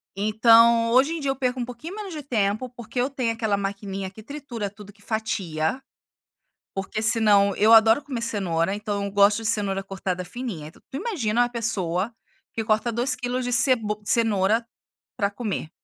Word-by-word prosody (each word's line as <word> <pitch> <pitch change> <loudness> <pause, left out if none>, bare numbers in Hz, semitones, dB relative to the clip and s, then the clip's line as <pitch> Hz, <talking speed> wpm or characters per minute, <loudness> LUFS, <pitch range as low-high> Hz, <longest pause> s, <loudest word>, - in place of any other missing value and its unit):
Então 230 +3 +5
hoje 265 +7 +4
em 330 - -4
dia 275 -1 0
eu - - -3
perco 255 -1 -2
um 240 - -2
pouquinho 270 - -8
menos 405 -5 -7
de 300 - -6
tempo, 220 -2 -1
porque 240 0 -7
eu 255 +3 +1
tenho 255 -4 -1
aquela 220 -3 -1
maquininha 195 -1 -4
que 215 +3 -13
tritura 240 -5 -6
tudo, 205 0 -13
que 205 0 -25
fatia, 205 -3 -2 0.9
porque 200 +3 -4
senão 210 -3 +4
eu 215 +2 +4
adoro 225 +5 +6
comer 260 -5 -5
cenoura, 195 -5 -1
então 205 -1 -3
eu 200 - -4
gosto 205 +2 +3
de 220 - 0
cenoura 200 -3 0
cortada 190 -2 -4
fininha, 195 -8 -6
então 160 - -18
tu - - -6
imagina 265 - 0
uma 245 - 0
pessoa 210 -3 -1 0.4
que 225 - -3
corta 215 +2 +1
2 240 +3 0
quilos 250 +1 -3
de 245 - -3
ceb 255 0 +6 0.2
cenoura 220 0 +2 0.5
pra 200 0 -1
comer. 200 -7 -4
220 Hz, 180 wpm, -24 LUFS, 200-245 Hz, 0.9 s, adoro